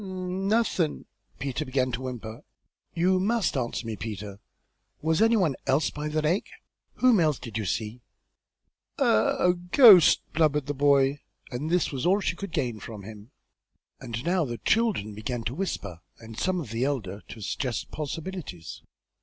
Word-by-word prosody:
"N 185 0 -4
Nothin' 205 -7 +1 0.2
" - - -37
Peter 135 +2 -3
began 130 -2 0
to 120 +1 -4
whimper. 120 -4 -7 0.5
"You 185 +2 +3
must 215 0 +1
answer 120 -2 -2
me, 110 -1 -4
Peter; 105 -2 -7 0.6
was 160 +4 +1
any 225 +1 +5
one 165 -9 +2
else 140 +4 +2
by 150 +1 -4
the 155 0 -1
lake? 170 +7 0 0.5
Whom 250 -5 +4
else 155 -5 +2
did 115 -4 -9
you 110 -2 -2
see?" 110 +5 -3 1.0
"A - - +2 0.3
a 180 - +3
ghost!" 180 - +7
blubbered 150 -3 +2
the 145 - -2
boy, 140 0 +3 0.3
and 135 +5 -3
this 180 0 +1
was 135 +2 -2
all 195 +3 +4
she 190 - -1
could 200 0 -7
gain 120 -7 -2
from 105 -3 -9
him. 105 +2 -11 0.7
And 115 +3 -6
now 175 0 +2
the 120 -5 -4
children 210 - +1
began 115 +3 -4
to 115 - -2
whisper, 100 - -4 0.2
and 115 -1 -11
some 185 +9 0
of 140 -10 -7
the 115 +2 -1
elder 105 -8 -2
to - - -10
suggest 120 +4 -3
possibilities. 150 - -6
145 Hz, 170 wpm, -27 LUFS, 115-180 Hz, 1.0 s, ghost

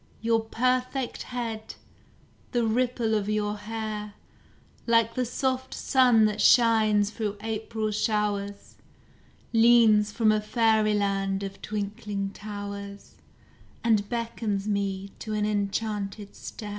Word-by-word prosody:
Your 225 0 +2
perfect 255 +2 -1
head, 230 -3 -5 0.8
the 240 -2 +2
ripple 235 0 0
of 210 -1 0
your 210 -1 0
hair, 210 -1 -5 0.7
Like 230 -1 +3
the 250 +1 -1
soft 260 +1 -2
sun 250 -4 +4
that 210 0 0
shines 215 -3 +4
through 210 -2 -3
April 220 0 -3
showers, 205 -1 -2 0.8
Leans 225 -2 +5
from 220 -1 +3
a 215 0 +1
fairyland 210 -3 +1
of 195 0 -7
twinkling 205 -1 -4
towers, 200 -1 -8 0.7
And 215 -3 +2
beckons 225 -4 -2
me 200 -1 -2
to 215 - -5
an 210 0 0
enchanted 205 0 -2
stair. 210 -3 -8
215 Hz, 110 wpm, -27 LUFS, 205-230 Hz, 0.8 s, Leans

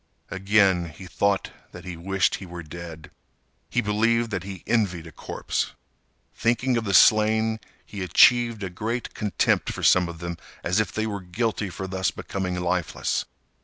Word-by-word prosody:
Again 95 -3 +3
he 80 +5 -11
thought 100 +2 0 0.2
that 90 0 -10
he 90 -1 -5
wished 95 +3 +1
he 95 - -4
was 85 -2 -8
dead. 80 -1 -9 0.6
He - - +1
believed 115 +2 +1
that 95 -3 -2
he 95 -1 -8
envied 95 -8 0
a 80 - -10
corpse. - - -3 0.6
Thinking 120 +2 +1
of 115 -1 -1
the 100 - -1
slain, 110 +2 +5 0.3
he 100 - -7
achieved 115 +4 +4
a 95 - -4
great 115 +6 -3
contempt 105 -2 +1
for - - -7
some 90 -1 +5
of 85 - -8
them, 85 0 -5 0.3
as 90 +4 +1
if 110 - 0
they 110 - -2
were 100 -3 -4
guilty 100 +2 -2
for 95 +2 -6
thus 95 -1 -1
becoming 90 -2 -4
lifeless. 90 -1 -1
95 Hz, 165 wpm, -25 LUFS, 90-110 Hz, 0.6 s, slain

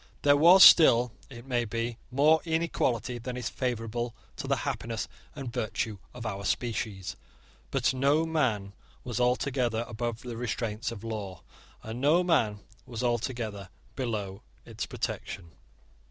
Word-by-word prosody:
There 145 0 +6
was 175 +6 +8
still, 125 -7 +8 0.2
it 120 -2 -11
may 125 -3 0
be, 115 +1 -3
more 150 +5 +4
inequality 155 -8 -1
than 125 +1 -5
is 120 -2 -3
favourable 120 -1 -3 0.2
to - - -5
the - - +2
happiness 115 -2 -3 0.3
and 135 -5 -6
virtue 110 -1 -2
of 120 -1 -9
our 100 -2 -4
species: 105 -3 -2 0.5
but - - +1
no 140 +5 +2
man 120 -12 0 0.3
was 120 -1 -3
altogether 125 -2 +1
above 120 0 -4
the 120 -2 -6
restraints 115 -1 -3
of 115 -3 -8
law; 105 -4 -5 0.4
and 110 +3 -6
no 160 +6 +4
man 110 - +1 0.3
was 120 -1 -5
altogether 115 -5 -2 0.3
below 105 -6 -3 0.2
its - - -5
protection. 85 -4 -5
120 Hz, 140 wpm, -29 LUFS, 110-130 Hz, 0.5 s, was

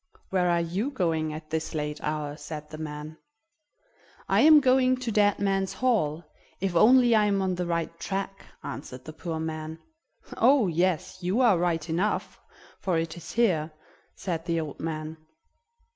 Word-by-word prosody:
Where 180 -2 +2
are 170 0 +2
you 185 +10 -2
going 165 - -1
at 155 0 -9
this 160 0 -3
late 150 0 -3
hour?" 150 -1 -3
said 150 0 -8
the 155 - -8
man. 150 0 -7 1.1
"I - - +3
am 310 0 +8
going 255 -1 +3
to 250 -2 -3
Dead 205 -1 +3
Man's 195 -1 0
Hall, 175 -11 0 0.4
if 190 -2 -2
only 240 +6 +6
I 215 -1 +4
am 200 -1 +1
on 190 -1 0
the 180 -1 -3
right 170 0 -2
track," 195 +2 -4 0.2
answered 130 0 -7
the 155 - -8
poor 160 0 -5
man. 160 0 -5 0.6
"Oh! 260 0 +5
yes, 180 +1 0
you 185 +6 0
are 220 -8 +5
right 170 -2 0
enough, 175 +6 -1 0.4
for 180 -3 0
it 165 -1 -2
is 170 - -9
here," 170 -10 +1 0.4
said 165 -3 -4
the 165 -1 +1
old 155 -3 -6
man. 155 0 -4
170 Hz, 165 wpm, -27 LUFS, 155-200 Hz, 1.1 s, am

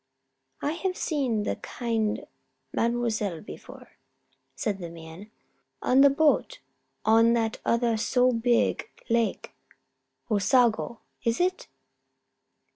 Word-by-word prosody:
"I 290 - +1
have 365 +3 -3
seen 260 -9 -1
the - - -2
kind 225 -3 -2 0.5
Mademoiselle 230 -6 0
before," - - -12 0.6
said 210 -7 -2
the 170 -2 -6
man. 165 +4 -11 0.5
"On 260 +2 +4
the 280 - +8
boat 310 - +2 0.5
on 225 +1 +5
that 225 -2 0
other 235 -1 +2
so 250 +3 +2
beeg 240 0 +1 0.2
lake 230 -1 0 0.8
Osago, 235 +1 +2 0.2
is 230 0 0
it?" 365 +1 0
235 Hz, 105 wpm, -27 LUFS, 215-255 Hz, 0.8 s, the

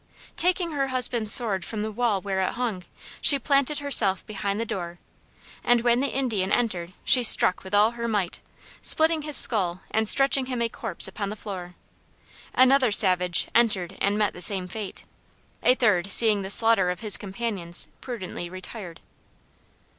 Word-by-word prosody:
Taking 355 -1 +2
her 275 -2 -3
husband's 245 -4 0
sword 205 -7 +4
from 210 +3 -6
the 215 - -5
wall 215 -3 -2
where 195 -1 -4
it 185 - -3
hung, 225 -7 -5 0.4
she 285 - +6
planted 280 +2 -1
herself 235 -9 +1
behind 200 -1 -5
the 230 - -3
door; 175 -5 -7 0.7
and 240 -1 +1
when 240 0 0
the 275 - -1
Indian 225 -9 -3
entered 185 -7 -3
she 260 -2 +4
struck 205 -5 +4
with 190 +2 -5
all 210 +2 +3
her 235 0 -6
might, 205 -6 -4 0.4
splitting 320 0 +1
his 300 -1 +2
skull 185 -6 +5
and 220 -1 +1
stretching 270 -1 +3
him 250 -2 -5
a 235 0 -2
corpse - - -1
upon 200 -2 -6
the 210 - -7
floor. 185 -4 -10 0.8
Another 260 -1 +3
savage 180 -4 +3
entered 195 -6 -1
and 200 +1 -1
met 210 -1 -1
the 180 - -10
same 185 -1 +2
fate. 205 +1 -9 0.6
A 250 - +2
third 200 -6 -1
seeing 215 -1 +3
the 190 - -8
slaughter 225 -3 +4
of 180 0 -6
his 215 -3 +2
companions 195 -4 -3
prudently 190 -8 -8
retired. 185 -1 -11
215 Hz, 170 wpm, -23 LUFS, 190-245 Hz, 0.8 s, she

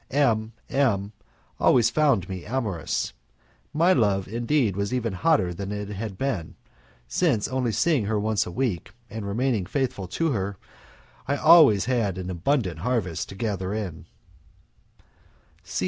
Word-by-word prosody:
M 115 -6 +1
M 105 -8 +1 0.5
always 120 -3 +4
found 140 - +2
me 95 -2 -6
amorous. 105 - -2 0.6
My 170 +5 +4
love, 100 - +1
indeed, 120 -1 0
was 100 +1 -2
even 120 -4 -1
hotter 95 - +2
than 100 +3 -5
it 105 -1 -4
had 105 -1 -5
been, 120 -12 -3 0.5
since, 120 - +1
only 125 -1 -1
seeing 125 +2 +1
her 105 0 0
once 110 0 0
a - - -6
week 105 -6 -2 0.2
and 110 -2 -5
remaining 110 -2 0
faithful 125 -7 -2
to 165 - -1
her, 100 -4 -2 0.7
I - - +1
had - - -6
always 150 - +7
an 100 -7 -1
abundant 90 - 0
harvest 100 -4 -2
to 95 - -9
gather 100 -2 -2
in. 90 -7 -5
110 Hz, 140 wpm, -25 LUFS, 95-130 Hz, 0.7 s, always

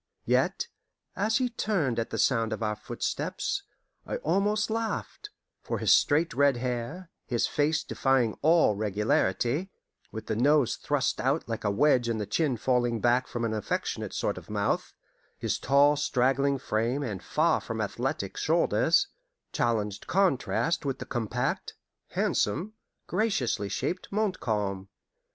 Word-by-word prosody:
Yet, - - +1 0.5
as 215 +3 +1
he 255 -2 +1
turned 185 - 0
at 115 - -2
the - - -4
sound 115 -4 +2
of 110 - -4
our 105 0 0
footsteps, 120 - -3 0.4
I - - -4
almost 210 - +1
laughed; 230 - -3 0.3
for - - -3
his - - +2
straight 155 +3 +3
red 140 -1 +3
hair, 125 +8 -4 0.2
his 120 -3 +1
face 155 +1 +1
defying 130 -5 +1
all 160 -8 +4
regularity, 105 - 0 0.4
with 110 - -6
the 110 - -2
nose 140 +2 +3
thrust 145 -3 0
out 135 +5 0
like 115 -1 -4
a 105 - +1
wedge 120 +2 +3
and 115 -1 -1
the 105 - -2
chin 145 +1 0
falling 120 -1 +1
back 120 +3 +2
from 120 -1 -3
an 110 - -1
affectionate 105 -2 -2
sort - - -1
of - - -18
mouth, - - -1 0.4
his - - -2
tall 140 +2 +4
straggling 140 0 +1
frame 120 +3 -1
and 105 -8 -4
far - - +1
from - - -5
athletic - - -3
shoulders, - - +3 0.5
challenged 105 -3 -1
contrast 170 -2 +1
with 135 -2 -2
the - - -7
compact, 120 -5 -2 0.3
handsome, 165 - 0 0.3
graciously 175 - 0
shaped 115 - -3
Montcalm. 105 - -1
130 Hz, 140 wpm, -28 LUFS, 115-160 Hz, 0.5 s, all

